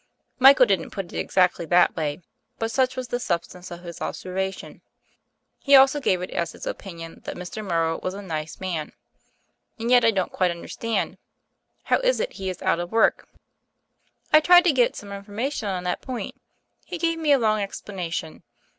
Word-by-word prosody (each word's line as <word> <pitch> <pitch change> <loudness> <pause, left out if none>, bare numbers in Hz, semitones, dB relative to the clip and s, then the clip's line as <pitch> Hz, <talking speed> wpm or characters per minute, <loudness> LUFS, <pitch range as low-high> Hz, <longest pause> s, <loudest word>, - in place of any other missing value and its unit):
Michael 265 0 +8
didn't 190 -7 0
put 190 -3 -6
it - - -3
ex - - -6
actly 180 -2 +3
that 180 +2 +4
way; 150 -1 -3 0.4
but 225 0 -2
such 255 +2 +1
was 255 -1 -5
the 245 - -1
substance 175 -3 -3
of 175 0 -9
his 170 -2 -9
observation. 190 +1 -4 0.8
He 280 -1 +5
also 270 +2 +6
gave 185 -9 +1
it 180 - -6
as 170 -1 -2
his - - -10
opinion 165 -3 -7
that - - -5
Mr. 180 +4 -7
Morrow 165 -4 0
was 185 +1 -3
a 200 - -7
nice 160 -4 -5
man. 175 -5 -4 0.8
And 230 +1 -2
yet 245 -1 +6
I 230 - +6
don't 190 -4 -1
quite 185 -1 +1
understand. 215 +6 -3 0.6
How - - +2
is - - +1
it - - -2
he 190 -2 -4
is 185 - -6
out - - +2
of 175 0 -5
work?" 225 0 +2 1.1
"I 310 - +9
tried 355 +3 +7
to 355 - +4
get 250 -4 +2
some 200 -1 -9
information 205 +4 -4
on 185 -2 -3
that 180 0 -2
point. 255 -3 -5 0.5
He 360 - -6
gave 330 0 0
me 310 -2 +1
a 280 - +7
long 215 -3 +2
explanation. 180 -5 -5
195 Hz, 190 wpm, -24 LUFS, 175-250 Hz, 1.1 s, I